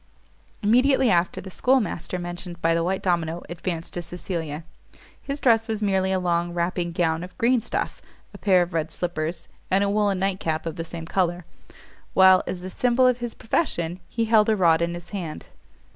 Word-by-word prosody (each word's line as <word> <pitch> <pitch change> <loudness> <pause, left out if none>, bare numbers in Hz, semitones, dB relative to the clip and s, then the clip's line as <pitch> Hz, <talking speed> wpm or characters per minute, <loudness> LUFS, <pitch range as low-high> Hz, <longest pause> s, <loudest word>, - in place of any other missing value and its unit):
Immediately 255 +3 +4
after 175 0 +1
the 190 - -9
schoolmaster 230 -7 0
mentioned 175 0 -7
by 165 0 +2
the 165 0 +1
white 190 +2 -1
domino 170 -2 0
advanced 175 -1 -5
to 175 - -2
Cecilia. 165 -3 -5 0.6
His 280 +1 -4
dress 225 -3 +3
was 220 -1 -2
merely 190 -2 +1
a 190 - +2
long 175 -1 0
wrapping 175 0 -1
gown 165 -1 0
of 180 0 -10
green 240 +1 +3
stuff, - - -3 0.3
a - - -11
pair 185 -3 +4
of 175 0 -8
red 160 -1 -1
slippers, 170 -1 -3 0.2
and 195 +2 +3
a 200 - +1
woollen 205 -2 +2
night 190 0 -1
cap 160 0 -2
of 165 -2 -4
the 165 - -4
same 165 0 -7
colour; 175 -1 0 0.7
while, 190 -1 +7
as 180 -1 -4
the 185 - -6
symbol 250 +3 +2
of 250 -1 +3
his 240 -1 -4
profession, 180 - -1
he 230 -1 -1
held 220 -1 +4
a 220 - +4
rod 170 -4 +4
in 170 0 -1
his 175 0 -10
hand. 175 -7 -6
180 Hz, 190 wpm, -24 LUFS, 170-210 Hz, 0.7 s, while